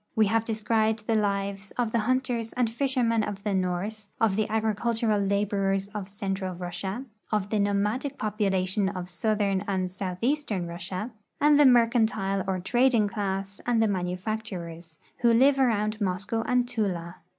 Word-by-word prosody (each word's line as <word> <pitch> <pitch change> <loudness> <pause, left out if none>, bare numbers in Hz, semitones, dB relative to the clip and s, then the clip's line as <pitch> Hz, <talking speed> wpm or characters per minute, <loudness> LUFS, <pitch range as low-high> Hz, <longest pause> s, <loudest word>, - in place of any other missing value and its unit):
We 220 - +5
have 225 +2 +1
described 220 -1 0
the 225 - +1
lives 200 -1 -1
of 240 -3 0
tlie 235 - +2
hunters 245 0 0
and 245 -3 0
fisher 260 +1 0
men 230 -1 +2
of 200 -1 -5
the 210 - 0
north, 190 +3 -2
of 220 -4 +3
the 215 +1 0
agricultural 220 0 +1
laborers 195 -1 0
of 205 -2 -5
central 195 -2 -3
Russia, 185 +7 -5 0.3
of 205 -2 -1
the 215 - +1
nomadic 210 +8 0
po})ulation 195 -2 0
of 180 -1 -4
southern 200 -1 0
and 185 -2 -1
southeastern 195 +3 -2
Russia, 180 +6 -5 0.3
and 295 0 +5
the 290 - +8
mercantile 220 -5 +3
or 190 -1 0
trading 240 +2 +3
class 195 -1 -3
and 240 -2 +3
the 225 - +4
manufacturers, 180 -3 -4 0.2
who 235 -1 +3
live 270 +4 +5
around 215 -4 +1
Moscow 195 +4 -1
and 250 -1 +2
Tula. 180 -7 -2
210 Hz, 155 wpm, -27 LUFS, 195-230 Hz, 0.3 s, the